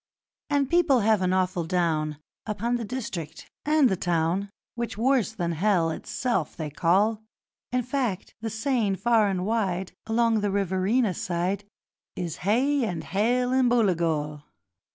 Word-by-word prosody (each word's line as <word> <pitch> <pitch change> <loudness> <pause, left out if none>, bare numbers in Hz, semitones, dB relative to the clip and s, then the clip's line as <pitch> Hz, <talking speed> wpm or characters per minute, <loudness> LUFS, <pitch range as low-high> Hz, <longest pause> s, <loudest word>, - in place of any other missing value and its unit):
'And 285 -2 +2
people 315 -6 +3
have 215 -1 +3
an 185 0 +1
awful 185 -2 +1
down 160 -3 0 0.3
Upon 230 +3 -1
the 235 - -4
district 205 - -6
and 300 -2 +4
the 195 - +1
town 175 +3 0 0.2
Which 235 -3 -4
worse 245 -3 +2
than 175 -6 -2
hell 170 -1 +2
itself 245 +9 -2
they 155 -2 -4
call; 200 +8 +2 0.5
In 250 0 +1
fact, 245 -7 -2
the 225 - -2
saying 220 -2 0
far 225 0 +3
and 185 -1 -1
wide 190 -4 -1 0.2
Along 230 0 +2
the 205 - 0
Riverina 195 +3 +1
side 180 +4 -2 0.5
Is 170 -2 -4
"Hay 260 +8 +2
and 175 -7 -2
Hell 245 +7 +1
and 260 -1 +4
Booligal". 165 -10 +1
205 Hz, 145 wpm, -26 LUFS, 175-240 Hz, 0.5 s, and